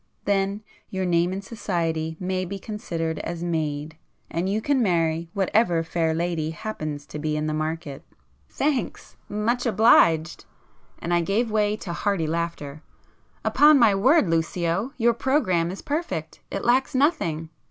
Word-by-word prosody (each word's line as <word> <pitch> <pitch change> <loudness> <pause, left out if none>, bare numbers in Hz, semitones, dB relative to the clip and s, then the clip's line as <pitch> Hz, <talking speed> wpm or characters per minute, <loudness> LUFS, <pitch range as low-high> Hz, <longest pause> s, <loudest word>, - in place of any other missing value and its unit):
Then 200 +1 0 0.3
your 190 -1 -2
name 175 0 +2
in 195 +1 -4
society 165 -7 -2
may 185 0 -1
be 190 +2 -5
considered 170 -6 -4
as 170 0 -5
made, 155 -2 -2 0.3
and 175 +3 -1
you 205 +2 +1
can 270 +3 +1
marry 165 -4 +1
whatever 190 -3 +2
fair 165 0 0
lady 165 -2 -1
happens 155 -5 -5
to 150 - -7
be 155 0 -1
in 150 - -1
the 155 - -1
market!" 155 -2 -4 0.5
"Thanks!—much 245 -4 -2
obliged!" 170 -7 +4 0.5
and 175 - -3
I 175 - +3
gave 215 +6 0
way 210 -1 +2
to 175 -5 -6
hearty 195 -3 0
laughter—"Upon 170 - 0
my 230 -5 +5
word 255 - +4
Lucio, 170 +6 0
your 235 -1 +3
programme 215 - +1
is 190 - -7
perfect! 290 - -3
It 195 - -4
lacks 260 +3 +2
nothing!" 165 - +1
175 Hz, 140 wpm, -24 LUFS, 160-215 Hz, 0.5 s, my